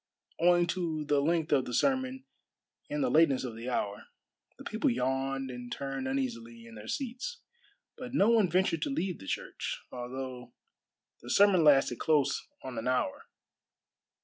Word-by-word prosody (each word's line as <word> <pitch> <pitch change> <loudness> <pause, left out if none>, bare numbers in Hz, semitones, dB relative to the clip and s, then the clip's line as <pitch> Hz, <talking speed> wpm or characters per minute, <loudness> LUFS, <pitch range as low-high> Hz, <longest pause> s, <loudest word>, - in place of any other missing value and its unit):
Owing 175 0 +5
to 170 -3 -2
the 145 -1 +2
length 160 +1 +1
of 135 -3 +3
the 125 - -3
sermon 265 -1 +1 0.6
and 295 -1 -1
the 260 - +1
lateness 150 -5 +4
of 120 -3 -5
the 115 +3 -5
hour, 105 -4 -2 0.5
the - - -11
people 220 +7 0
yawned 135 - -1
and 125 -1 -8
turned 135 -1 -3
uneasily 120 -3 -3
in 115 - -12
their 110 0 -10
seats. 265 - -4 0.6
But 255 +1 -6
no 210 0 +5
one 220 -6 +4
ventured 180 -1 +1
to 295 - -1
leave 195 - -2
the 95 - -11
church, - - -3
although 125 0 -6 0.7
the 120 - -10
sermon 195 +1 +5
lasted 135 -5 +5
close 145 -3 +2 0.2
on 130 -3 -5
an 115 - -4
hour. 125 -6 -1
140 Hz, 160 wpm, -30 LUFS, 125-190 Hz, 0.7 s, Owing